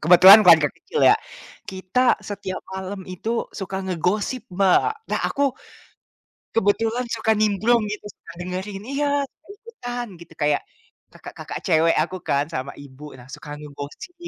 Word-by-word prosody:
kebetulan 180 +5 +9
keluarga 160 -5 +7
kecil - - -4
ya, - - +5 0.5
kita 190 +7 +1
setiap 195 -2 -6
malam 190 +1 -5
itu 220 +6 -3
suka 190 -1 -5
ngegosip, 190 +7 -1
Mbak. 195 - +3 0.2
Nah - - 0
aku 280 - -2 1.1
kebetulan 225 +3 +1
suka 225 0 +1
nimbrung 215 +3 +2
gitu, 210 0 -6
suka - - -16
dengerin. 190 +2 -5
Iya, 280 +2 -1 0.2
suka - - -37
ikutan 245 - -7
gitu. 170 -1 -14
Kayak 145 0 +1 0.5
kakak-kakak - - -8
cewek 165 +1 +3
aku 175 +4 -4
kan 140 0 +1
sama 140 -3 -5
ibu, 140 0 -13
nah 125 +1 -14
suka 145 - -10
ngegosip 145 - -9
190 Hz, 140 wpm, -22 LUFS, 165-225 Hz, 1.1 s, kebetulan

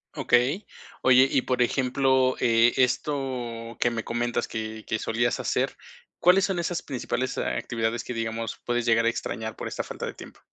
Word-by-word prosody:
Okey. 135 - +2 0.4
Oye, 130 +1 +6
y 130 - +2
por 125 -1 0
ejemplo, 130 +1 +2
eh, 115 0 +4
esto, 125 -4 -1
que 120 - +2
me 115 -1 -3
comentas 120 0 -1
que 110 0 -5
que 110 - 0
solías 115 +2 0
hacer, - - 0 0.4
¿cuáles 180 +3 +5
son 190 -2 -1
esas 170 0 -1
principales 130 -1 -3
actividades 115 0 -2
que 125 - -6
digamos, 115 0 -3
puedes 120 0 0
llegar 115 0 +4
a - - +5
extrañar 110 -1 -4
por - - -5
esta - - -3
falta - - -6
de - - -6
tiempo? - - -12
120 Hz, 170 wpm, -26 LUFS, 115-130 Hz, 0.4 s, Oye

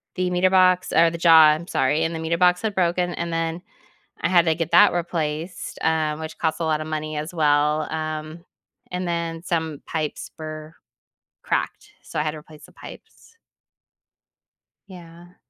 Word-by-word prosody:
the 180 -1 -1
meter 180 +1 +2
box 185 -1 +3
or 165 +1 +5
the 170 - -6
jaw, 165 -2 +7
I'm 155 +3 -1
sorry, 150 +5 +1
and 165 - -1
the - - -4
meter 160 +1 -1
box 180 0 +3
had 220 -2 -2
broken, 175 0 0
and 170 0 -4
then 165 +1 -2 0.6
I - - 0
had 175 -2 +4
to 160 - +3
get 165 0 -3
that - - +7
replaced, 170 0 -4
um, 155 -1 0
which 160 0 -7
costs 160 0 -1
a - - 0
lot 155 -1 0
of 155 - -5
money 155 0 -4
as 155 +4 -5
well. 150 0 +1
Um, 155 +1 -5 0.5
and 180 0 -3
then 170 -1 -3
some 160 -4 -3
pipes 155 -2 -4
bur 155 0 -8 0.7
cracked, - - -3
so - - -5
I 150 - +1
had 155 - -1
to 155 - -9
replace 155 0 -14
the - - -19
pipes. 460 - -15 1.5
Yeah. 175 -1 -14
165 Hz, 180 wpm, -23 LUFS, 155-175 Hz, 1.5 s, jaw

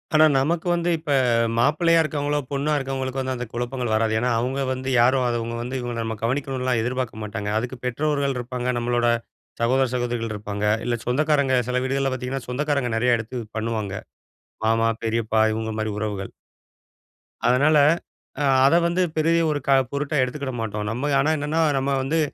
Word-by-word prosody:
ஆனா 155 0 +7
நமக்கு 165 +6 0
வந்து 170 0 0
இப்ப 155 -2 -5 0.5
மாப்பிள்ளையா 165 +5 +3
இருக்கிறவங்களோ, 145 -2 -1
பொண்ணா 140 +2 -1
இருக்கவங்களுக்கு 135 -1 -3
வந்து 130 0 -2
அந்த 125 0 -4
குழப்பங்கள் 120 0 -3
வராது. 110 0 +2
ஏன்னா, 125 +1 0
அவங்க 130 +3 -1
வந்து 130 0 -3
யாரும் 130 +2 +4
அத 120 -1 0
அவங்க 115 +1 -4
வந்து 125 +2 -4
இவங்க 120 -1 -4
நம்ப 110 0 -3
கவனிக்கணும்லாம் 130 -1 0
எதிர்பார்க்க 125 -2 -3
மாட்டாங்க, 105 -1 -4
அதுக்கு 125 +2 -5
பெற்றோர்கள் 140 +1 0
இருப்பாங்க. 125 0 -4
நம்பளோட 120 0 +1 0.5
சகோதர, 130 +2 +3
சகோதரிகள் 120 -3 -2
இருப்பாங்க. 105 0 -4 0.2
இல்ல 120 -1 0
சொந்தக்காரங்க 140 0 +2
சில 125 0 +1
வீடுகள்ல 135 0 0
பாத்தீங்கன்னா, 130 0 -4
சொந்தக்காரங்க 140 -1 0
நெறைய 120 0 +3
எடுத்து 120 +3 -6 0.2
பண்ணுவாங்க. 110 -3 -2 0.7
மாமா, 115 +1 +3 0.2
பெரியப்பா, 110 -1 +1
இவங்க 110 0 -3
மாதிரி 110 -1 -2
உறவுகள். 105 -3 -4 1.2
அதுனால 145 +5 +4 0.6
அ - - +1 0.2
அத 140 - +5
வந்து 175 +2 0 0.2
பெரிய 165 +2 +3
ஒரு 145 - -1
க - - +3 0.2
பொருட்டா 145 +1 -1
எடுத்துகிட 130 +1 -3
மாட்டோம். 105 -1 -3
நம்ம 125 +6 -2
ஆனா 155 - +2
என்னன்னா, 150 +3 0 0.2
நம்ம 135 +1 0
வந்து 160 +5 0
125 Hz, 160 wpm, -23 LUFS, 115-140 Hz, 1.2 s, ஆனா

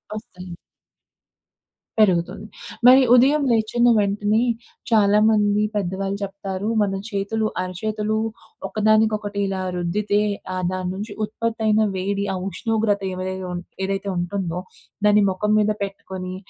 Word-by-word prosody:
ఒస్తాయి. 195 -5 -9 1.5
పెరుగుతుంది. 185 0 +2 0.4
మరి 260 +2 +9
ఉదయం 280 +4 +4
లేచిన 230 +2 +2
వెంటనే, 205 +2 +1 0.5
చాలామంది 210 -1 +4
పెద్దవాళ్ళు 195 0 -2
చెప్తారు. 195 0 -5
మన 195 -1 +1 0.2
చేతులు 205 +2 -1 0.2
అరచేతులు 210 +4 -2 0.5
ఒకదానికొకటి 215 0 +1
ఇలా 190 -1 -3 0.2
రుద్దితే, 205 +4 0 0.3
ఆహ్, 185 0 -3
దాని 185 -1 -3
నుంచి 205 +2 -6
ఉత్పత్తి 225 +1 -4
అయిన 215 0 +4
వేడి, 200 +2 -1
ఆ - - -2
ఉష్ణోగ్రత 220 -2 0
ఏవై 185 0 -4 0.6
ఏదైతే 195 0 -3
ఉంటుందో 175 -1 -2 0.5
దాన్ని 210 0 +5
మొఖం 210 +3 -1
మీద 210 0 +2
పెట్టుకొని, 190 -2 -6
205 Hz, 110 wpm, -22 LUFS, 190-215 Hz, 1.5 s, మరి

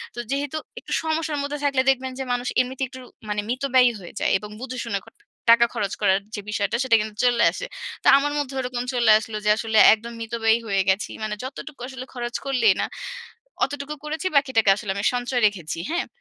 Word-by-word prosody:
তো - - -6
যেহেতু 285 +2 -1 0.2
একটু - - -12
সমস্যার 315 -1 -1
মধ্যে 285 +1 -3
থাকলে 275 -2 +3
দেখবেন 260 0 +1
যে - - -1
মানুষ 245 0 -2
এমনিতে 260 +1 -4
একটু 260 0 -11 0.3
মানে 210 0 0
মিতব্যয়ী 255 0 +3
হয়ে 175 -3 -11
যায় - - +1
এবং 210 +2 -9
বুঝে 255 0 -6
শুনে 215 -4 -1
কট - - -18 0.3
টাকা 235 0 +7
খরচ 200 -2 -2
করার 190 +1 +4 0.2
যে 205 - -4
বিষয়টা 210 +1 -1
সেটা 255 -3 +4
কিন্তু 215 0 -6
চলে 240 -1 +3
আসে। - - -5 0.4
তো - - 0
আমার 290 +1 0
মধ্যেও 275 -2 -3
ওরকম 250 -1 -3
চলে 240 -3 +4
আসলো 220 0 -6
যে - - +3
আসলে 220 -1 -1 0.2
একদম 230 +2 -5
মিতব্যয়ী 225 0 +1
হয়ে 195 -2 +2
গেছি। 190 +2 +1
মানে 215 -1 -2
যতটুকু 275 +1 -8
আসলে 260 -1 -8
খরচ 240 -1 -5
করলেই 245 -7 +4
না, - - +1 0.8
অতটুকু 285 +1 -6
করেছি 315 +4 -2
বাকিটাকে 260 -7 +4
আসলে 205 -1 -4
আমি 200 +1 -2
সঞ্চয় 245 0 -1
রেখেছি, 175 -6 -4
হ্যাঁ? 345 +2 -1
245 Hz, 200 wpm, -23 LUFS, 215-270 Hz, 0.8 s, টাকা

